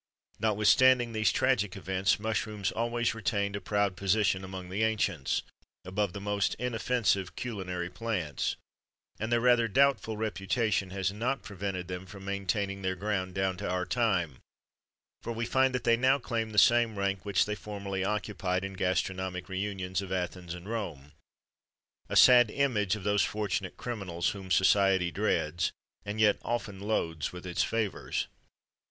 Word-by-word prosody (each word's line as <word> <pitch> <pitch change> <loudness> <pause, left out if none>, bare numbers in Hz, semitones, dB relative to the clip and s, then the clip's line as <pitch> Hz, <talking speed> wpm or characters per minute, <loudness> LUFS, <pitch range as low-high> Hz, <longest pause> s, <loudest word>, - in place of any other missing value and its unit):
Notwithstanding 115 +3 +4
these 110 -2 +2
tragical 105 -8 +1
events, 95 +1 +1
mushrooms 105 -2 -2
always 120 +1 0
retained 100 -3 -1
a 100 - -4
proud 100 0 0
position, 100 0 +1
among 95 -1 -7
the 95 +4 -2
ancients, 100 -10 0 0.4
above 95 0 -1
the 100 - -5
most 100 0 0
inoffensive 115 -5 0
culinary 95 -7 -4
plants; 95 - -2 0.6
and 110 +2 -3
their 120 - +4
rather 120 -1 +4
doubtful 135 -2 +2
reputation 105 -1 0
has 95 0 -1
not 120 +6 -2
prevented 95 -3 -4
them 90 +1 -6
from 95 0 -11
maintaining 100 0 -2
their 95 -1 -1
ground 95 -1 -2
down 95 -1 0
to 100 -1 -4
our 90 0 -1
time, 95 - 0 0.8
for 115 - -4
we 115 +1 -2
find 130 +2 +3
that 125 - -2
they 115 -1 +4
now 130 +3 +4
claim 115 -4 -2
the 105 - -8
same 115 +1 +5
rank 100 -1 -1
which 100 -2 +2
they 105 - -2
formerly 100 -2 -4
occupied 95 -2 -1
in 95 - -5
the 95 - -11
gastronomic 95 0 -1
réunions 95 -1 -3
of 95 -1 -7
Athens 90 -1 -3
and 90 +2 -10
Rome: 85 -11 -5 1.0
a - - -2
sad 120 -2 +8
image 110 -6 +1
of 105 - -8
those 105 0 +2
fortunate 100 -3 -2
criminals, 95 -8 -2
whom 95 -2 -7
society 95 -1 +4
dreads, 85 -4 0 0.3
and 105 +2 -5
yet 105 -2 +4
often 115 -5 -3
loads 85 -7 -1
with 90 0 -9
its 90 -1 -1
favours. 110 -3 -1
100 Hz, 155 wpm, -30 LUFS, 95-110 Hz, 1.0 s, sad